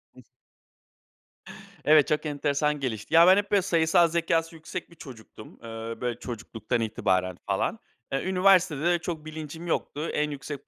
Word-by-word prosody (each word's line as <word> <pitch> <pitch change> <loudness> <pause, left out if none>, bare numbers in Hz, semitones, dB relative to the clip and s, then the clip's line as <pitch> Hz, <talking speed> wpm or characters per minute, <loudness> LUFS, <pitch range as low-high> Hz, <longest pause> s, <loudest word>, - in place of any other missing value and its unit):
Ih. - - -15 1.6
Evet, 150 -1 +6
çok 150 +1 0
enteresan 150 0 0
gelişti. 125 0 -4
Ya, 170 +1 +8
ben 190 +1 +7
hep, 205 0 -1
böyle, 200 -1 +4
sayısal 170 -1 +3
zekâsı 165 0 0
yüksek 165 +3 -7
bir 170 - -16
çocuktum. 115 -7 -12
Eee, 115 0 -6
böyle, 120 -1 -2
çocukluktan 115 0 -4
itibaren 95 -4 0
falan. 100 - -1 0.3
E, 135 - -1
üniversitede 180 -5 +3
de 175 0 +3
çok 160 -2 -5
bilincim 155 +2 -8
yoktu. 155 -1 -2
En 150 0 0
yüksek 140 0 -7
150 Hz, 150 wpm, -26 LUFS, 125-170 Hz, 1.6 s, Ya